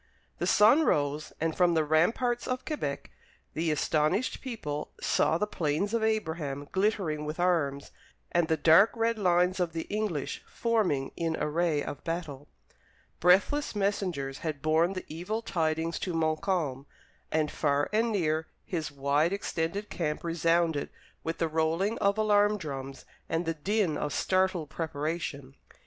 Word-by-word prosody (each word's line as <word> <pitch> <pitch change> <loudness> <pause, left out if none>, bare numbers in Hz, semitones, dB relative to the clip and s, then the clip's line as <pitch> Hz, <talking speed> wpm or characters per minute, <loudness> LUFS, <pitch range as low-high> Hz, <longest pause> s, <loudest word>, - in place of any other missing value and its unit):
The - - 0
sun 230 +10 +6
rose, 145 - 0
and 160 0 -1
from 175 -2 +3
the 160 - +3
ramparts 225 - +1
of 255 0 -3
Quebec 305 -2 -4 0.4
the 160 +1 -1
astonished 155 - 0
people 150 - -4
saw 160 - +2
the 210 - 0
Plains 175 +2 -1
of 230 - +1
Abraham 160 -10 -1
glittering 190 -6 0
with 155 +3 -5
arms, 150 -6 0 0.4
and 170 -1 +2
the 160 -1 +1
dark 165 +8 +6
red 230 0 0
lines 180 -1 +2
of 175 -3 0
the 165 -1 -3
English 205 -9 -2
forming 205 - 0
in 165 -1 -1
array 155 -1 +1
of 145 - -7
battle. 160 -4 -4 0.7
Breathless 200 - +3
messengers 180 -9 -1
had 155 -4 -4
borne 160 +4 +3
the 185 - -6
evil 195 +8 -4
tidings 160 -3 -1
to 180 -3 -3
Montcalm, 155 -3 -1 0.4
and 155 -1 +1
far 145 -1 +1
and 225 +2 +2
near 160 -5 0 0.2
his 165 -7 -3
wide 145 +4 +1
extended 195 0 -3
camp 150 -3 -2
resounded 165 -2 +1 0.3
with 165 - -3
the 165 - +1
rolling 165 +7 0
of 200 0 +2
alarm 210 -1 +3
drums 135 -6 -6 0.2
and 165 +2 0
the 165 - 0
din 185 0 0
of 150 - -2
startled 185 -4 +1
preparation. 150 -3 -4
165 Hz, 145 wpm, -29 LUFS, 150-200 Hz, 0.7 s, sun